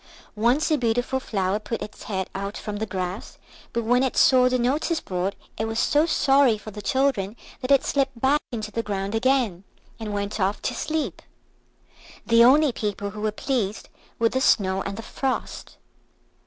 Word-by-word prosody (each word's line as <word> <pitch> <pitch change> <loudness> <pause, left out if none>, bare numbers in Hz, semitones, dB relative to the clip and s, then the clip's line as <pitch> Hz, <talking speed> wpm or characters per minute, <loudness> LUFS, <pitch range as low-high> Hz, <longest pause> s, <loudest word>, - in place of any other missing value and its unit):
Once 245 +9 +2
a 305 - +3
beautiful 245 +3 0
flower 195 -5 -1
put 225 +1 -4
its - - -10
head 190 -3 -2
out 200 +1 -4
from 210 -1 -5
the 220 +1 -3
grass, 185 +1 -5 0.3
but 235 -1 -1
when 245 +3 +3
it 265 -1 -1
saw 255 -1 +6
the 255 - +1
notice 290 +7 0
board 185 +1 -3 0.2
it 220 - 0
was 225 0 -3
so 300 +3 +3
sorry 270 -7 +4
for 215 +1 -10
the 210 +1 -8
children 240 -4 0 0.3
that 255 - -4
it 275 -1 +4
slipped 270 -3 0
back 280 +4 +3
into 215 -3 -4
the 230 - -1
ground 200 -2 -3
again, 225 -6 +1 0.4
and 220 -2 -5
went 205 +1 -3
off 195 +1 0
to - - -2
sleep. 315 -1 -3 1.0
The 230 0 +6
only 285 +4 +6
people 205 -2 -3
who 210 0 -8
were 215 0 0
pleased 215 -3 -2 0.3
were 230 0 +3
the 260 - -1
Snow 190 -6 +3
and 200 0 -5
the 225 - -6
Frost. 265 +3 -4
225 Hz, 180 wpm, -24 LUFS, 205-265 Hz, 1.0 s, saw